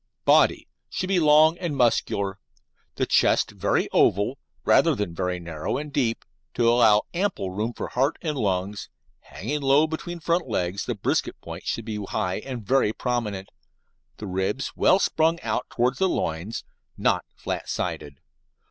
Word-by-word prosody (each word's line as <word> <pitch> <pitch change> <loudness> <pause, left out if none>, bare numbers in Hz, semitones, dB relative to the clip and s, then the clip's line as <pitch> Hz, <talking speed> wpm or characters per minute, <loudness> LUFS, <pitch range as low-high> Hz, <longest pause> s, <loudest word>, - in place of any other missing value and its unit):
BODY - - +4 0.2
Should 185 - -3
be 190 -2 +3
long 155 +1 +5
and 165 -6 -3
muscular, 100 -5 +1 0.6
the - - 0
chest - - +3
very - - 0
oval, 105 +8 +2 0.3
rather 165 -3 +4
than 105 -7 -3
very 90 +1 -2
narrow 80 -3 -4
and 150 0 -6
deep, 120 -6 0 0.3
to 120 - +2
allow 115 -3 +5
ample 175 - -1
room 105 +5 -2
for - - -6
heart 135 +5 0
and 155 -3 -1
lungs, 100 -3 -2 0.3
hanging 150 +1 -5
low 140 +3 +4
between 165 +2 -5
front 170 0 0
legs, 95 -2 -1
the - - -1
brisket - - -1
point - - -9
should 115 - -2
be 105 -2 -4
high 90 -1 -2
and 120 -2 -7
very 130 -3 +3
prominent, 110 -7 -3 0.7
the 110 - -7
ribs 95 +6 -2
well 185 - +4
sprung 165 -3 +1
out 115 +2 -2
towards 125 +2 0
the 190 -1 +3
loins 85 - -3 0.3
(not - - +1
flat - - -5
sided). 70 -2 -4
120 Hz, 155 wpm, -25 LUFS, 100-150 Hz, 0.7 s, long